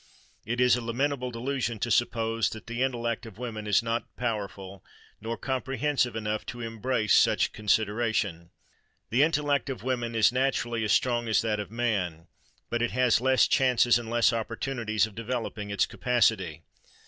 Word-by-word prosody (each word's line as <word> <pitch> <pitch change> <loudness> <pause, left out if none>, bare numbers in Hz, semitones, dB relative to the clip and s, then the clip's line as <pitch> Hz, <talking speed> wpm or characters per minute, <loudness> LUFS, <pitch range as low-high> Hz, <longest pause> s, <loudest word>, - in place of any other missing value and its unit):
It 120 +2 -2
is 125 -1 +5
a 125 - -3
lamentable 125 +2 -1
delusion 125 -1 -2
to 120 +3 -2
suppose 115 0 +1
that 110 - -9
the 120 +1 -4
intellect 120 -3 -1
of 105 -3 -12
woman 110 -3 -5
is 105 +2 +3
not 115 +1 -3
powerful 100 -5 -4 0.4
nor 115 +2 -4
comprehensive 135 -1 -1
enough 110 -1 -2
to 120 - -6
embrace 115 -1 0
such - - +4
considerations. 105 -4 0 0.6
The 125 +4 +3
intellect 145 -3 +1
of 130 -4 -5
woman 120 -2 -2
is 110 0 +5
naturally 125 -3 0
as 105 - 0
strong 120 0 +2
as 110 - +2
that 110 -2 0
of 105 -3 -5
man; 100 -8 -2 0.5
but 120 - 0
it 120 - +1
has 125 -2 +2
less 130 0 +4
chances 125 -2 +4
and 115 -1 -7
less 120 0 +3
opportunities 115 -2 -1
of 110 - -11
developing 115 -2 -4
its 100 -1 +2
capacity. 100 -10 0
115 Hz, 160 wpm, -27 LUFS, 110-125 Hz, 0.6 s, is